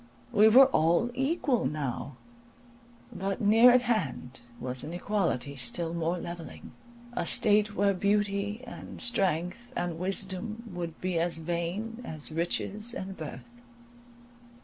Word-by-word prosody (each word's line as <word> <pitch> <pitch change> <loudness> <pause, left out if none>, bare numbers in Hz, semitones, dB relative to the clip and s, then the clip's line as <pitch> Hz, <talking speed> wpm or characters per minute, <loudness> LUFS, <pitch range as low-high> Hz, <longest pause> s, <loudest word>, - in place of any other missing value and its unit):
We 215 -2 +6
were 260 +5 +9
all 175 0 +2
equal 270 - +1
now; 140 -2 -4 1.0
but 195 0 -3
near 225 +4 +7
at 250 0 +5
hand 145 - -2 0.2
was 125 0 -3
an 155 - -6
equality 175 -8 -1
still 140 +7 -1
more 170 +1 -1
levelling, 170 -1 -8 0.4
a 240 - -1
state 210 0 +2
where 200 0 +3
beauty 205 +3 0
and 235 - -9
strength, 195 0 -1
and 175 -2 -2
wisdom, 195 +4 -2
would 170 -2 -5
be 180 -2 0
as 170 0 0
vain 175 +8 -3
as 155 -8 -7
riches 200 +7 0
and 190 0 -5
birth. 160 +9 -8
190 Hz, 125 wpm, -29 LUFS, 165-220 Hz, 1.0 s, were